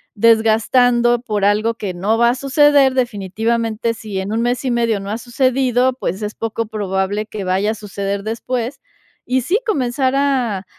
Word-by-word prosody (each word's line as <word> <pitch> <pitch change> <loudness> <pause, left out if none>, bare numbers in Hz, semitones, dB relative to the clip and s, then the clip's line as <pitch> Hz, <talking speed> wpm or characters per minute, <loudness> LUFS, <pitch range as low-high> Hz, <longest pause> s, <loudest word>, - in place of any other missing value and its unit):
desgastando 230 +2 +3
por 210 -4 -2
algo 210 +3 +2
que 205 -4 -5
no 210 +6 0
va 235 0 +5
a 245 - +1
suceder, 275 0 +4
definitivamente, 230 0 -1
si 215 -3 -5
en 190 +2 -4
un 225 +1 0
mes 245 +1 -1
y 260 - -1
medio 230 -3 +1
no 195 +1 -7
ha 215 - -2
sucedido, 255 +1 +1
pues, 190 +5 -3
es 210 0 -4
poco 225 0 -3
probable 205 -1 -2
que 215 -2 -6
vaya 190 +3 0
a - - -2
suceder 200 -1 -4
después. 240 +4 -3 0.5
Y 255 +1 +1
sí, 360 - 0
comenzar 260 - 0
a 255 -8 0
230 Hz, 170 wpm, -18 LUFS, 210-250 Hz, 0.5 s, va